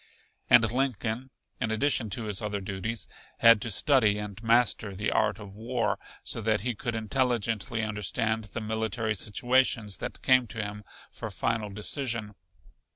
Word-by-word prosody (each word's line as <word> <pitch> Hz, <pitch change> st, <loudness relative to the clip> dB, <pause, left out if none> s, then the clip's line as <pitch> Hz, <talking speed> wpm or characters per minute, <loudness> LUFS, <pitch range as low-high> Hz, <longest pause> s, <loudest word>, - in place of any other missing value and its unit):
And 115 Hz, -2 st, +6 dB
Lincoln, 125 Hz, -1 st, -1 dB, 0.3 s
in 110 Hz, -, -1 dB
addition 115 Hz, 0 st, +1 dB
to 110 Hz, +4 st, -2 dB
his 105 Hz, -3 st, -1 dB
other 105 Hz, -1 st, -2 dB
duties, 100 Hz, +2 st, -4 dB, 0.3 s
had 115 Hz, -2 st, +7 dB
to 115 Hz, -, -3 dB
study 110 Hz, -1 st, +4 dB
and 105 Hz, 0 st, -6 dB
master 115 Hz, -3 st, +2 dB
the 105 Hz, +3 st, -1 dB
art -, -, +2 dB
of 100 Hz, -3 st, -10 dB
war, 115 Hz, +2 st, -1 dB, 0.2 s
so 115 Hz, -, -1 dB
that 110 Hz, -1 st, +1 dB
he 120 Hz, +2 st, -1 dB
could 115 Hz, +2 st, -4 dB
intelligently 115 Hz, -1 st, 0 dB
understand 110 Hz, +1 st, -1 dB
the 110 Hz, +3 st, -6 dB
military 110 Hz, 0 st, -1 dB
situations 115 Hz, -1 st, +1 dB
that 125 Hz, -, -6 dB
came 130 Hz, -2 st, +5 dB
to 115 Hz, -, -8 dB
him 105 Hz, +1 st, -6 dB, 0.3 s
for -, -, -6 dB
final 115 Hz, -2 st, -1 dB
decision. 110 Hz, +1 st, -2 dB
110 Hz, 155 wpm, -28 LUFS, 105-120 Hz, 0.3 s, had